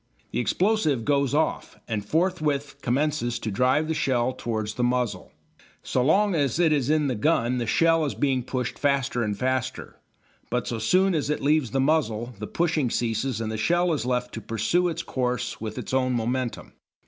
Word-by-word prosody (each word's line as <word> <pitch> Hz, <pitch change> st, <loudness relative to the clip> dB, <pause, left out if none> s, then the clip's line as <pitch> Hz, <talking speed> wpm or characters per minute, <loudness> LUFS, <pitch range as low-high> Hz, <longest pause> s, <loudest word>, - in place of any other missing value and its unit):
The -, -, -1 dB
explosive 155 Hz, -, +1 dB
"goes 140 Hz, -1 st, +2 dB
off" 155 Hz, -, -1 dB
and 110 Hz, -3 st, -2 dB
forthwith 150 Hz, -, 0 dB
commences 135 Hz, -1 st, 0 dB
to 110 Hz, -, -4 dB
drive 130 Hz, +8 st, +2 dB
the 160 Hz, -, 0 dB
shell 130 Hz, -5 st, +1 dB
towards 110 Hz, -4 st, -3 dB
the 125 Hz, -, -2 dB
muzzle. 120 Hz, -6 st, -1 dB, 0.5 s
So 125 Hz, -, 0 dB
long 200 Hz, +8 st, +3 dB
as 145 Hz, -6 st, +1 dB
it 165 Hz, -3 st, +4 dB
is 140 Hz, -3 st, 0 dB
in 155 Hz, -1 st, +3 dB
the 135 Hz, -, 0 dB
gun 125 Hz, 0 st, +1 dB
the 120 Hz, -, -2 dB
shell 165 Hz, +7 st, +3 dB
is 140 Hz, -, -3 dB
being 135 Hz, -3 st, +1 dB
pushed 125 Hz, 0 st, -4 dB
faster 140 Hz, -4 st, +1 dB
and 105 Hz, -3 st, -1 dB
faster, 130 Hz, +1 st, -3 dB, 0.5 s
but 125 Hz, 0 st, -1 dB
so 115 Hz, -, -3 dB
soon 185 Hz, +12 st, +3 dB
as 150 Hz, -3 st, -1 dB
it 150 Hz, -, 0 dB
leaves 150 Hz, -3 st, +2 dB
the 135 Hz, -, -1 dB
muzzle 125 Hz, -5 st, +1 dB
the 105 Hz, -, -5 dB
pushing 160 Hz, -6 st, 0 dB
ceases 120 Hz, +1 st, -1 dB
and 110 Hz, -1 st, -3 dB
the 110 Hz, -, -3 dB
shell 175 Hz, +10 st, +2 dB
is 150 Hz, -, -1 dB
left 125 Hz, 0 st, -1 dB
to 115 Hz, -, -5 dB
pursue 115 Hz, -, 0 dB
its 170 Hz, -, -3 dB
course 125 Hz, -3 st, -2 dB
with 110 Hz, -1 st, -5 dB
its -, -, -5 dB
own 130 Hz, -1 st, +2 dB
momentum. 120 Hz, +1 st, -2 dB
130 Hz, 190 wpm, -25 LUFS, 120-155 Hz, 0.5 s, it